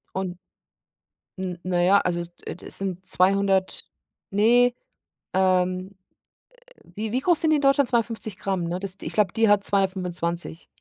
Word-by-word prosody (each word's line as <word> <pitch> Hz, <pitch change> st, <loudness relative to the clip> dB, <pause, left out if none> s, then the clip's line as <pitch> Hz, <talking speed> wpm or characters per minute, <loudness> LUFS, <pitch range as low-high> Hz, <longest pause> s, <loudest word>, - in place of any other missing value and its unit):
Und 185 Hz, -2 st, -3 dB, 1.0 s
N 180 Hz, -2 st, -4 dB
na 175 Hz, -1 st, 0 dB
ja, 195 Hz, +3 st, +5 dB
also 175 Hz, -1 st, -1 dB
es, 170 Hz, 0 st, -8 dB
äh, -, -, -5 dB
d -, -, -12 dB
sind 190 Hz, -1 st, -4 dB
200, 195 Hz, 0 st, +2 dB, 0.5 s
ne 240 Hz, +5 st, +4 dB, 0.6 s
ähm, 185 Hz, 0 st, +1 dB, 0.7 s
äh, -, -, -23 dB, 0.2 s
wie 215 Hz, +1 st, -4 dB
wie 250 Hz, -, +1 dB
groß 340 Hz, +4 st, +2 dB
sind 320 Hz, -, +2 dB
die 310 Hz, -, +4 dB
in -, -, -2 dB
Deutschland? 275 Hz, -1 st, +4 dB
250g, 220 Hz, -6 st, -1 dB
ne? 175 Hz, +2 st, -3 dB
Das, 195 Hz, -1 st, -2 dB
d -, -, -10 dB
ich -, -, -4 dB
glaube, 205 Hz, -4 st, +1 dB
die 225 Hz, -1 st, +3 dB
hat 205 Hz, -1 st, +4 dB
225. 180 Hz, -4 st, -1 dB
190 Hz, 160 wpm, -24 LUFS, 180-215 Hz, 1.0 s, ja